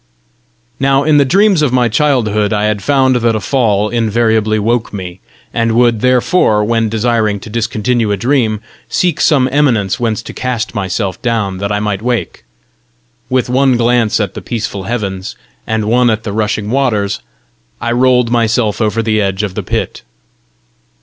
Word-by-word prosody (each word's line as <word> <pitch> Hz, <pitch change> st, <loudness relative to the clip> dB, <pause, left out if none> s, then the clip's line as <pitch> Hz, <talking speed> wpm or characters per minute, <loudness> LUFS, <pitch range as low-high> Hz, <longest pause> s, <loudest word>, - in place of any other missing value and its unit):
Now 135 Hz, 0 st, +2 dB
in 155 Hz, 0 st, +3 dB
the 140 Hz, -, +4 dB
dreams 195 Hz, +3 st, +3 dB
of 145 Hz, -4 st, +1 dB
my 125 Hz, -1 st, +2 dB
childhood 115 Hz, -5 st, +1 dB
I 105 Hz, -1 st, 0 dB
had 105 Hz, -1 st, -1 dB
found 130 Hz, -1 st, +2 dB
that 115 Hz, -2 st, +1 dB
a -, -, 0 dB
fall 105 Hz, -5 st, +1 dB
invariably 110 Hz, -1 st, +1 dB
woke 115 Hz, +2 st, 0 dB
me, 95 Hz, -3 st, -7 dB, 0.3 s
and 115 Hz, -1 st, 0 dB
would, 120 Hz, -2 st, +2 dB
therefore, 125 Hz, -3 st, +2 dB
when 115 Hz, 0 st, 0 dB
desiring 110 Hz, -2 st, 0 dB
to 110 Hz, -, -10 dB
discontinue 115 Hz, 0 st, -1 dB
a 100 Hz, -, 0 dB
dream, 115 Hz, -3 st, 0 dB, 0.3 s
seek 175 Hz, -4 st, 0 dB
some 135 Hz, -5 st, +3 dB
eminence 120 Hz, -9 st, +1 dB
whence 115 Hz, -2 st, -1 dB
to -, -, -9 dB
cast 125 Hz, -3 st, -3 dB
myself 95 Hz, -1 st, -3 dB
down 110 Hz, -6 st, -1 dB
that 100 Hz, +1 st, -2 dB
I 105 Hz, -, 0 dB
might 105 Hz, -2 st, -2 dB
wake: 120 Hz, 0 st, -3 dB, 0.9 s
with 130 Hz, -1 st, +1 dB
one 130 Hz, 0 st, +2 dB
glance 120 Hz, -2 st, +2 dB
at 100 Hz, -4 st, -2 dB
the -, -, -7 dB
peaceful 105 Hz, -5 st, -4 dB
heavens, 100 Hz, -5 st, -4 dB, 0.3 s
and 110 Hz, -1 st, -1 dB
one 120 Hz, +3 st, +3 dB
at 110 Hz, 0 st, -1 dB
the 100 Hz, -, -4 dB
rushing 105 Hz, 0 st, -2 dB
waters, 110 Hz, -7 st, 0 dB, 0.6 s
I 120 Hz, -, -2 dB
rolled 125 Hz, -1 st, +2 dB
myself 115 Hz, -2 st, +1 dB
over 110 Hz, +1 st, 0 dB
the 110 Hz, -1 st, +1 dB
edge 100 Hz, 0 st, -1 dB
of 100 Hz, -3 st, -3 dB
the -, -, -3 dB
pit. -, -, -3 dB
115 Hz, 170 wpm, -14 LUFS, 105-125 Hz, 0.9 s, the